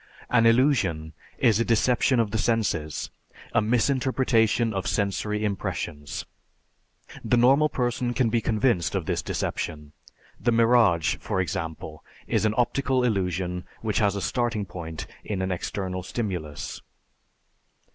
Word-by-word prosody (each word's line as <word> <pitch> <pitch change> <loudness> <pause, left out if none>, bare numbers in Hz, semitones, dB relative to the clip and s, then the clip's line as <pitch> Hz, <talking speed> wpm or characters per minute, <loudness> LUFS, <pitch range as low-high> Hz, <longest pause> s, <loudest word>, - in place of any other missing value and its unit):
An 115 -2 +5
illusion 105 - +2 0.2
is 110 -3 +3
a - - +3
deception 120 +2 +2
of 110 -3 +1
the 110 - -1
senses, 95 -11 -1 0.4
a - - +4
misinterpretation 120 -1 +2
of 95 -1 -2
sensory 105 +1 -1
impressions; 75 -7 -4 1.0
the 120 - +2
normal 135 +5 +5
person 120 -1 -1
can 125 -4 +2
be 115 0 +2
convinced 110 - +1
of - - -1
this - - -1
deception. 75 -3 -4 0.5
The 120 - +1
mirage, 115 -8 +4
for 95 - -2
example, 80 -3 -4 0.2
is - - 0
an 110 0 +1
optical 130 +1 +1
illusion 90 -5 -1 0.2
which 110 -2 0
has 100 -2 +2
a 100 - -3
starting 120 -3 -1
point 85 -3 -7 0.2
in 105 -3 -3
an 95 - -1
external 95 +1 -3
stimulus. 90 -8 -4
110 Hz, 130 wpm, -26 LUFS, 90-120 Hz, 1.0 s, An